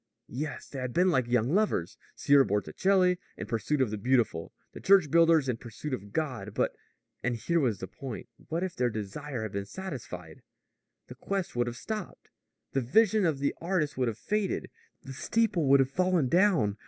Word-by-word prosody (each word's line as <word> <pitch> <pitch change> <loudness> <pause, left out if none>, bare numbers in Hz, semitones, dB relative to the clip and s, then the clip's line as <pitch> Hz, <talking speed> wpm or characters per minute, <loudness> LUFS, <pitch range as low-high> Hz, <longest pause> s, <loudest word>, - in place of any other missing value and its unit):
Yes, 145 +4 -4
they 135 - -7
had 130 -1 -4
been 180 +1 +4
like 130 -6 +1
young 120 +3 +1
lovers 205 - +1 0.2
Sieur 140 -1 +5
Botticelli, 180 - +2 0.2
in - - -5
pursuit 135 +5 -1
of 125 -5 +1
the 105 - -3
beautiful; 120 -8 +1 0.2
the - - -8
church 190 -6 +4
builders 165 -3 +5
in 125 -3 0
pursuit 120 +5 -7
of 100 -4 -5
God. 120 -8 -3
But - - 0 0.5
and 125 0 0
here 165 +9 0
was 120 -9 +1
the 95 - -6
point 135 -2 -7 0.2
what 165 +3 -2
if 185 -2 -3
their 125 -1 +1
desire 110 +4 -5
had 110 - -4
been 100 0 -4
satisfied? 105 - -7 0.6
The - - -10
quest 195 -7 -3
would 120 0 +1
have 120 0 -5
stopped. 215 +2 -6 0.4
The 135 - 0
vision 215 - +3
of 155 -4 0
the 140 +1 0
artist 165 -4 0
would 130 -1 0
have 110 -2 -2
faded. 210 - -2 0.3
The 135 - -8
steeple 210 - +1
would 140 +1 +6
have 135 0 +2
fallen 180 -5 +2
down. 170 - +3
135 Hz, 190 wpm, -29 LUFS, 115-175 Hz, 0.6 s, would